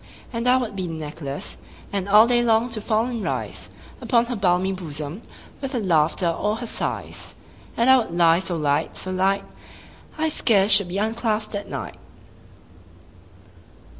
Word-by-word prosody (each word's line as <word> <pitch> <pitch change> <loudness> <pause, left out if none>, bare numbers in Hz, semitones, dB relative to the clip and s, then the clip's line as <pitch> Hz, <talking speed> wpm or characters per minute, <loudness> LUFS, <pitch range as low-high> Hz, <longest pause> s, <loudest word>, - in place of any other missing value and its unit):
And 230 +1 -2
I 250 +1 +5
would 240 -5 -3
be 185 -2 -3
the 165 - -5
necklace, 150 -2 -6 0.3
And 200 0 -2
all 210 +2 +8
day 240 0 +3
long 230 0 +2
to 225 -2 -3
fall 220 +1 +1
and 240 -3 -4
rise - - -4 0.3
Upon 235 -2 +2
her 245 0 -4
balmy 190 -1 +1
bosom, 155 -3 -5
15 - - -22 0.3
With 270 0 -4
her 245 - 0
laughter 170 -3 +2
or 210 +5 0
her 240 +2 -6
sighs: - - -5 0.4
And 235 - +2
I 260 0 +8
would 195 -8 -4
lie 165 -1 +5
so 180 -2 -3
light, 145 -2 0
so 185 - -4
light, 195 +2 +1 0.7
I 315 +1 +1
scarce 210 -8 +3
should 200 -2 +7
be 180 +2 -4
unclasp'd 220 0 -1
at 200 - -5
night. - - -6
200 Hz, 170 wpm, -23 LUFS, 175-230 Hz, 0.7 s, all